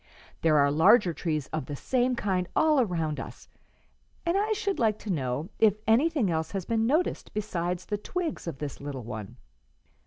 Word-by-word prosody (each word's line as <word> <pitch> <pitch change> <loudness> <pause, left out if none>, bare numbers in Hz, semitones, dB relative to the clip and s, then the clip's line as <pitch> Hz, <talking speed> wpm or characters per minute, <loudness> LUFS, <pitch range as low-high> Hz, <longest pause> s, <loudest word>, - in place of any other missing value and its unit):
There 155 -2 +4
are 140 0 +4
larger 170 +5 +5
trees 155 -4 -2
of 155 -4 -3
the 145 - -4
same 250 - +1
kind 185 -5 -1
all 310 -2 +4
around 165 -8 -1
us, - - -9 0.8
and 340 +1 +1
I 420 +2 +1
should 400 -2 -2
like 220 -3 +2
to 210 - -5
know 135 +2 -2
if 215 -3 +5
anything 250 - +3
else 160 0 -2
has 195 -3 -3
been 225 -1 +1
noticed 315 +8 0
besides 180 -4 -2
the 210 -1 -3
twigs 340 - -4
of 165 - -4
this 145 -1 -6
little 140 -3 -5
one." 110 -4 -7
185 Hz, 180 wpm, -28 LUFS, 155-245 Hz, 0.8 s, larger